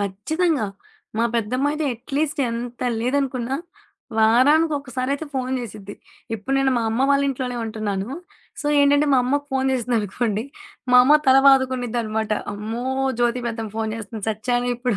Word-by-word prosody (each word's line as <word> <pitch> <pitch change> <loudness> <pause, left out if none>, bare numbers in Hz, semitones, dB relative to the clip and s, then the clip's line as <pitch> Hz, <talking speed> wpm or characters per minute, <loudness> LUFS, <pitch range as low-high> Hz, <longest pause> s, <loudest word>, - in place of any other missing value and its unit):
ఖచ్చితంగా. 225 - 0 0.5
మా 230 - +3
పెద్దమ్మాయితో 265 +7 0
అట్లీస్ట్ 285 +4 -2
ఎంత 240 +1 -5 0.2
లేదనుకున్నా, 255 0 -1 0.6
వారానికొకసారయితే 275 +3 +2
ఫోను 260 -1 -2
చేసిద్ది. 205 -3 -8 0.4
ఇప్పుడు 245 +6 -3
నేను 270 -1 +2
మా 235 - +1
అమ్మ 235 +4 0
వాళ్ళింట్లోనే 270 -3 0
ఉంటున్నాను. 215 -2 -3 0.5
సో, 295 - -4
ఏంటంటే 285 +1 +4
మా 260 - +5
అమ్మకి 285 +3 0
ఫోను 265 0 +1
చేసిందనుకోండి, 225 -2 -1 0.5
మా - - +8
అమ్మ 295 +3 +6
తల 265 0 +7
బాదుకునిదినమాట. 245 -5 +2 0.2
అమ్మో! 220 +4 -5 0.3
జ్యోతి 240 +1 +1
పెద్దమ్మ 225 -2 -4
ఫోను 220 -1 -1
చేస్తుంది 215 -1 -7
సచ్యానే 245 +3 -1
ఇప్పుడు. 245 -4 -1
245 Hz, 130 wpm, -22 LUFS, 225-275 Hz, 0.6 s, మా